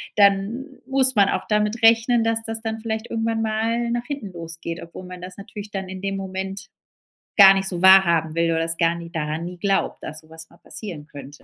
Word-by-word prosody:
dann 200 Hz, +4 st, +3 dB, 0.2 s
muss 265 Hz, -1 st, +5 dB
man 200 Hz, -2 st, +5 dB
auch 185 Hz, -, -2 dB
damit 210 Hz, +2 st, 0 dB
rechnen, 230 Hz, +1 st, +4 dB
dass 225 Hz, 0 st, 0 dB
das 225 Hz, 0 st, -3 dB
dann 225 Hz, 0 st, -4 dB
vielleicht 220 Hz, 0 st, -4 dB
irgendwann 225 Hz, 0 st, -1 dB
mal 225 Hz, +2 st, -1 dB
nach 240 Hz, 0 st, -2 dB
hinten 245 Hz, -8 st, -6 dB
losgeht, 165 Hz, -1 st, -7 dB
obwohl 170 Hz, +2 st, -10 dB
man 180 Hz, -1 st, -10 dB
das 180 Hz, +1 st, -9 dB
natürlich 205 Hz, +1 st, -9 dB
dann 190 Hz, -2 st, -5 dB
in 190 Hz, 0 st, -7 dB
dem 195 Hz, 0 st, -2 dB
Moment 190 Hz, 0 st, -6 dB, 0.7 s
gar 195 Hz, -2 st, +10 dB
nicht 195 Hz, 0 st, -1 dB
so 175 Hz, -2 st, -3 dB
wahrhaben 170 Hz, -4 st, +5 dB
will 170 Hz, 0 st, +1 dB
oder 165 Hz, 0 st, 0 dB
das 165 Hz, 0 st, -1 dB
gar 165 Hz, 0 st, +2 dB
nie 170 Hz, 0 st, -8 dB
daran 155 Hz, 0 st, -3 dB
nie 180 Hz, +1 st, -8 dB
glaubt, 195 Hz, +2 st, -1 dB
dass 155 Hz, 0 st, -7 dB
so 155 Hz, -, -24 dB
was 160 Hz, 0 st, -11 dB
mal -, -, -20 dB
passieren 160 Hz, -3 st, -9 dB
könnte, 145 Hz, -1 st, -12 dB
195 Hz, 215 wpm, -22 LUFS, 170-225 Hz, 0.7 s, gar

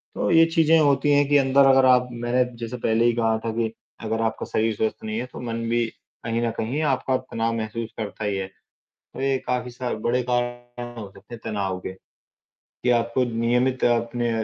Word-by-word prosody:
तो -, -, -1 dB
ये 165 Hz, 0 st, +7 dB
चीज़ें 165 Hz, 0 st, +5 dB
होती 145 Hz, -1 st, +3 dB
हैं 145 Hz, 0 st, +4 dB
कि 145 Hz, -, +5 dB
अंदर 135 Hz, 0 st, +4 dB
अगर 135 Hz, 0 st, +6 dB
आप 125 Hz, -1 st, +5 dB
मैं 120 Hz, +1 st, 0 dB
जैसे 115 Hz, +1 st, -6 dB
पहले 115 Hz, 0 st, +1 dB
ही 120 Hz, -, +4 dB
कहा 115 Hz, -1 st, +1 dB
था 115 Hz, -, 0 dB
कि 115 Hz, -1 st, 0 dB, 0.4 s
अगर 110 Hz, +1 st, -1 dB
आपका 110 Hz, -, -1 dB
शरीर 110 Hz, 0 st, +1 dB
स्वस्थ 110 Hz, +1 st, -2 dB
नहीं 110 Hz, 0 st, -3 dB
है। 125 Hz, -, -3 dB
तो -, -, -7 dB
मन 115 Hz, -1 st, -4 dB
भी 120 Hz, 0 st, +2 dB, 0.4 s
कहीं 115 Hz, +1 st, -1 dB
न 115 Hz, -, -1 dB
कहीं 130 Hz, +8 st, -2 dB
आपका 130 Hz, 0 st, -1 dB
तनाव 115 Hz, -3 st, -2 dB
महसूस 110 Hz, +1 st, -4 dB
करता 110 Hz, 0 st, -5 dB
ही 100 Hz, -1 st, 0 dB
है। 95 Hz, -, -3 dB, 0.7 s
तो -, -, -5 dB
ये 135 Hz, -1 st, +1 dB
काफ़ी 125 Hz, 0 st, -1 dB
सा 125 Hz, 0 st, -4 dB
बड़े 125 Hz, +1 st, +2 dB
कारण 120 Hz, 0 st, -3 dB
हो 100 Hz, -2 st, -7 dB
सकते 120 Hz, -, -14 dB
हैं -, -, -13 dB
तनाव 100 Hz, -4 st, -2 dB
के 95 Hz, -, -6 dB, 0.7 s
कि 125 Hz, -, -3 dB
आपको 120 Hz, +1 st, +2 dB
नियमित 125 Hz, +2 st, +1 dB
अपने 120 Hz, 0 st, +1 dB
120 Hz, 205 wpm, -24 LUFS, 115-125 Hz, 0.7 s, ये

